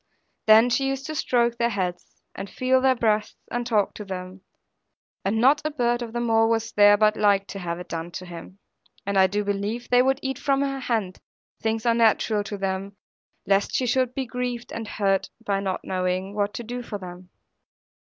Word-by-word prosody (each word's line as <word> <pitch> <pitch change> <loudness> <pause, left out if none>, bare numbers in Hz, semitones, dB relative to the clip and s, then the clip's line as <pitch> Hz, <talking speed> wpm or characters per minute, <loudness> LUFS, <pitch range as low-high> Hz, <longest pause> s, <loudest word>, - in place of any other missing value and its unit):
Then 220 +3 +7
she 270 +2 +1
used 270 0 -3
to 310 - -4
stroke 235 -5 +1
their 235 0 +2
heads, 185 -5 -4
and 195 +1 -7
feel 260 0 +1
their 260 0 +4
breasts, 215 -3 0 0.2
and 240 0 -2
talk 215 -4 +1
to 210 - -7
them; 185 -1 -7 0.8
and 210 +3 0
not 275 +5 +4
a 305 - 0
bird 240 -4 0
of 235 -2 -5
them 240 +1 -2
all 225 0 +3
was 225 -1 0
there 205 0 +6
but 215 0 +3
liked 200 -2 +2
to 195 - -6
have 170 -2 -4
it 180 - -9
done 165 +1 -4
to 185 - -6
him. 175 +2 -10 0.5
And 200 0 -2
I 190 -1 +6
do 205 +2 -1
believe 205 +4 -3
they 245 0 +6
would 265 +1 +2
eat 265 -1 -3
from 275 -1 +1
her 275 -1 -1
hand 220 -8 -2 0.4
things 225 0 -1
unnatural 225 -2 +3
to 205 - -5
them, 195 +1 -3 0.5
lest 195 +1 +1
she 255 - +1
should 255 0 +1
he 270 - -2
grieved 245 0 -4
and 225 -1 -5
hurt 195 -2 0 0.2
by 200 -2 0
not 190 -2 -2
knowing 185 +1 -2
what 205 0 -1
to 240 - -5
do 245 +2 -5
for 225 -3 -6
them. 180 -1 -10
220 Hz, 200 wpm, -24 LUFS, 195-240 Hz, 0.8 s, Then